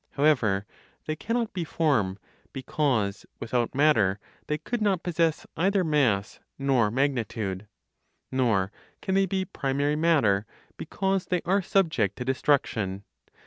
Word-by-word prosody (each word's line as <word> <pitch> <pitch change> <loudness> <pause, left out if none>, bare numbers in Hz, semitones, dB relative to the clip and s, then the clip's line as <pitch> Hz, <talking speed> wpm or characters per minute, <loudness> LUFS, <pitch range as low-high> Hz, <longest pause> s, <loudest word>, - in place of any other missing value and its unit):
However, 125 -10 +2 0.4
they 155 - -2
cannot 230 +6 -2
be 180 - -2
form, 140 - +1 0.4
because, 130 -7 -1 0.2
without 120 +2 -1
matter, 115 -10 +3 0.3
they 150 - 0
could 240 +7 -4
not 195 -5 +1
possess 165 -2 0
either 195 +3 +2
mass 130 - +1 0.2
nor 135 -6 +2
magnitude. 115 -6 -1 0.6
Nor 110 -7 +1 0.3
can 190 - -1
they 195 0 +3
be 190 +1 -1
primary 145 -2 -1
matter, 135 -12 +2 0.3
because 195 -1 -2
they 180 -2 -1
are 195 +3 +2
subject 160 - +1
to 125 - -5
destruction. 115 -8 0
140 Hz, 125 wpm, -27 LUFS, 110-170 Hz, 0.6 s, matter